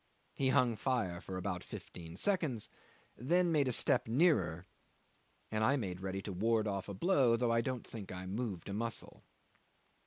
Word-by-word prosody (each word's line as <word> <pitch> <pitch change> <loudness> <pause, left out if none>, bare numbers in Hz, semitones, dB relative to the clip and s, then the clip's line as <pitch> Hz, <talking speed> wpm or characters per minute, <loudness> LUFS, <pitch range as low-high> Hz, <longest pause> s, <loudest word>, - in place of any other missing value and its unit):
He 135 - +1
hung 125 -4 +3
fire 105 -10 -1
for 95 -1 -6
about 90 -1 -3
fifteen 85 -1 -9
seconds, 160 - 0 0.5
then 175 +8 +2
made 145 -4 +3
a - - +2
step 115 - +2
nearer, 110 - +2 0.9
and 110 0 0
I 130 +6 +4
made 95 -7 -4
ready 95 0 -3
to 100 - -4
ward 110 +3 +2
off 100 -1 -3
a 100 - -5
blow, 130 - +4
though 120 0 +1
I 115 0 +3
don't 125 0 -3
think 105 -4 -8
I 90 0 -6
moved 100 -2 -3
a 100 - -4
muscle. 115 +2 -4
110 Hz, 175 wpm, -35 LUFS, 95-130 Hz, 0.9 s, I